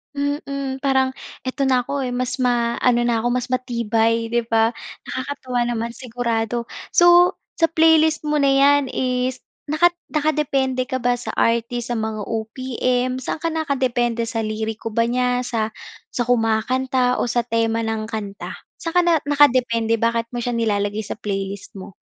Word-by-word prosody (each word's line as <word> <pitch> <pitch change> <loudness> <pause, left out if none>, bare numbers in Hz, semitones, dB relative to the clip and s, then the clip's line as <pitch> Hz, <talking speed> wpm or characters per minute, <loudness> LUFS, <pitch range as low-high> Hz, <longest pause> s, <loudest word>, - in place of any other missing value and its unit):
Mm, 280 -1 -3
parang, 265 -1 +2 0.3
"Eto 270 +1 -1
na 255 -1 +3
ako 280 +4 -3
eh, 250 - -3
mas 255 +1 -2
ma-ano 240 0 +2
na 235 -1 +1
ako, 230 - -1
mas 250 0 -2
matibay." 230 -2 0
'di 235 -1 0
ba. 225 0 +3 0.3
Nakakatuwa 260 -2 -3
naman 235 -1 -2
sigurado. 235 -1 -2 0.3
So, 350 +1 +6 0.2
sa 330 - +5
playlist 320 -1 +4
mo 300 0 0
na 280 - +3
yan 285 +1 +5
is 255 0 -1 0.3
naka 315 +4 +4 0.2
nakadepende 275 -4 0
ka 260 - -3
ba 245 0 +1
sa - - -6
artist? 235 +1 0
Sa 240 - 0
mga 220 -1 -3
OPM? 250 +3 -2
Saan 280 +4 -4
ka 330 - 0
nakadepende 255 -6 0
sa 230 0 -3
liriko 220 +1 -3
ba 230 - +3
niya? 250 +1 +1
Sa 225 -3 -2 0.4
sa 245 - 0
kumakanta 250 +2 +1
o - - 0
sa 240 0 +1
tema 230 -1 0
ng 220 -1 -2
kanta? 205 -3 -6 0.2
Saan 330 +1 -5
ka 355 - +6
na 340 -2 +3
nakadepende? 245 -6 +3
Bakit 230 0 0
mo 240 - -3
siya 240 0 -2
nilalagay 210 -2 0
sa 210 - -7
playlist 195 -1 -4
mo? 195 -1 -10
245 Hz, 160 wpm, -21 LUFS, 230-265 Hz, 0.4 s, So